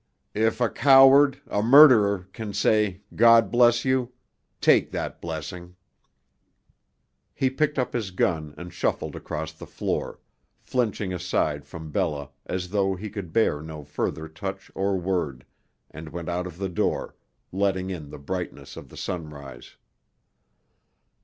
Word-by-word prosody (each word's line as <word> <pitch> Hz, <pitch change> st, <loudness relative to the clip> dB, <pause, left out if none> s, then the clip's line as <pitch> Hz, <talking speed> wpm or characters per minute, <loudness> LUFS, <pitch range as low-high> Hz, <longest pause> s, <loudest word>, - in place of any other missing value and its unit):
"If 110 Hz, +2 st, +1 dB
a 120 Hz, -, +3 dB
coward, 135 Hz, +2 st, +6 dB
a 105 Hz, -, -1 dB
murderer, 110 Hz, -7 st, +6 dB
can 105 Hz, -2 st, -6 dB
say 105 Hz, -2 st, +1 dB
'God 115 Hz, 0 st, +5 dB
bless 120 Hz, 0 st, +4 dB
you,' 130 Hz, -1 st, +1 dB, 0.5 s
take -, -, +4 dB
that -, -, -5 dB
blessing!" 85 Hz, +2 st, -7 dB, 1.6 s
He 130 Hz, -1 st, +1 dB
picked 150 Hz, +2 st, 0 dB
up 130 Hz, -, -1 dB
his 110 Hz, -5 st, -2 dB
gun 80 Hz, -5 st, -1 dB
and 90 Hz, +1 st, -9 dB
shuffled -, -, -2 dB
across 80 Hz, +1 st, -5 dB
the 80 Hz, -, -12 dB
floor, -, -, -3 dB, 0.4 s
flinching 110 Hz, -6 st, -2 dB
aside 80 Hz, -5 st, -1 dB
from 80 Hz, -2 st, -9 dB
Bella 75 Hz, -6 st, -2 dB, 0.2 s
as 90 Hz, -1 st, -3 dB
though 95 Hz, -2 st, +1 dB
he 105 Hz, +3 st, -7 dB
could 100 Hz, -6 st, -7 dB
bear 80 Hz, -7 st, +1 dB
no 80 Hz, -1 st, -8 dB
further 75 Hz, +2 st, -4 dB
touch 95 Hz, +4 st, -7 dB
or 95 Hz, 0 st, 0 dB
word, 85 Hz, -9 st, -2 dB, 0.5 s
and 80 Hz, +1 st, -9 dB
went 85 Hz, +1 st, -6 dB
out 90 Hz, +1 st, -2 dB
of 85 Hz, -2 st, -10 dB
the 95 Hz, +1 st, -2 dB
door, 85 Hz, -, -1 dB, 0.4 s
letting 95 Hz, -1 st, -1 dB
in 80 Hz, -6 st, -7 dB
the -, -, -9 dB
brightness 75 Hz, -2 st, -6 dB
of -, -, -11 dB
the -, -, -13 dB
sunrise. 75 Hz, -6 st, -7 dB
95 Hz, 140 wpm, -25 LUFS, 80-110 Hz, 1.6 s, coward